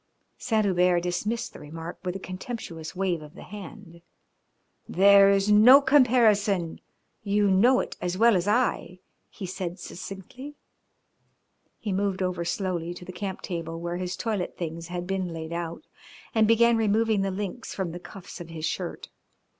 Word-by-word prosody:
Saint 220 -4 +1
Hubert 180 -2 +3
dismissed 210 +6 -2
the - - -11
remark 165 +3 -8
with 180 0 -3
a - - -4
contemptuous 185 -3 -7
wave 180 -3 -1
of 150 0 -13
the - - -10
hand. 200 -3 -11 0.9
"There 200 +1 +6
is 195 0 +3
to 220 +7 +7
comparison. 220 - +3 0.4
You 205 -1 +2
know 240 +8 +5
it - - -7
as 180 +1 -2
well 230 +1 +5
as 180 +1 0
I," 210 -5 0 0.3
he 200 - -8
said 180 -1 -5
succinctly. 200 +11 -9 1.2
He 210 -4 -3
moved 195 -1 0
over 180 -2 -2
slowly 175 -1 -2
to 180 - -10
the 185 - -7
camp 190 +1 -5
table, 165 -2 -4
where 170 +1 -3
his 180 0 -4
toilet 215 -6 -3
things 165 -1 -5
had 175 0 -4
been 190 0 -2
laid 165 -1 -6
out, 170 - -5 0.5
and 220 -2 +4
began 230 +1 +5
removing 220 -1 +2
the 195 - 0
links 205 +5 -5
from 190 -4 -2
the 175 - -7
cuffs 185 -1 -11
of 170 - -9
his 160 -1 -5
shirt. - - -4
190 Hz, 160 wpm, -26 LUFS, 175-210 Hz, 1.2 s, to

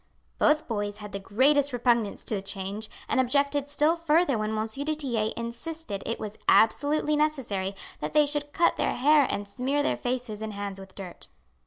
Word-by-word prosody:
Both 300 0 +3
boys 205 -2 -2
had 210 -1 -9
the 200 - -4
greatest 275 +8 +3
repugnance 235 -4 +1
to - - -1
the 200 - -1
change, 195 +2 -3 0.2
and 275 - +1
objected 280 +2 +1
still 300 +3 +3
further 330 -3 +2
when 215 0 -1
M. 215 - 0
du 285 +7 -2
Tillet 235 -8 -1
insisted 235 -1 -5
it 230 - -2
was 215 0 -7
absolutely 295 +6 +3
necessary 245 -11 -1 0.2
that - - -4
they 300 -1 +5
should 290 0 -3
cut 340 +3 +2
their - - 0
hair 290 +2 +5
and 205 0 -3
smear 260 +7 -1
their - - +1
faces 245 -4 -3
and 220 -1 -4
hands 200 -1 -5
with 190 -1 -12
dirt. 185 -3 -8
245 Hz, 185 wpm, -27 LUFS, 210-290 Hz, 0.2 s, they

